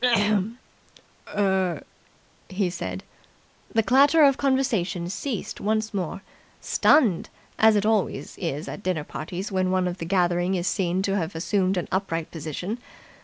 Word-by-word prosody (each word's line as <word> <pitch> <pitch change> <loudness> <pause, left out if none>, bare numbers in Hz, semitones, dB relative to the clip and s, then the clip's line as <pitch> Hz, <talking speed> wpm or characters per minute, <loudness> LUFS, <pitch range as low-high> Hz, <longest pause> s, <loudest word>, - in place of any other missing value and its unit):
"Er... 190 -5 +1 0.3
." - - -34
he 185 -1 -1
said. 95 - -5 0.7
The 225 - +2
clatter 280 +7 +5
of 275 -2 +6
conversation 240 -11 0
ceased 225 +2 -4
once 215 +1 0
more 190 0 -3 0.4
stunned, 235 - +3 0.3
as 220 0 +6
it 205 0 +1
always 215 -3 0
is 160 -3 -3
at - - -6
dinner 180 -6 -1
parties 175 +8 -6
when 185 -1 +1
one 185 -1 +1
of 180 +1 -4
the 165 - -4
gathering 175 0 +1
is 175 -1 -2
seen 185 -1 0
to 195 0 0
have 165 -1 -3
assumed 185 +3 0
an 175 - -2
upright 175 -4 -2
position. 165 - -5
190 Hz, 145 wpm, -25 LUFS, 175-215 Hz, 0.7 s, of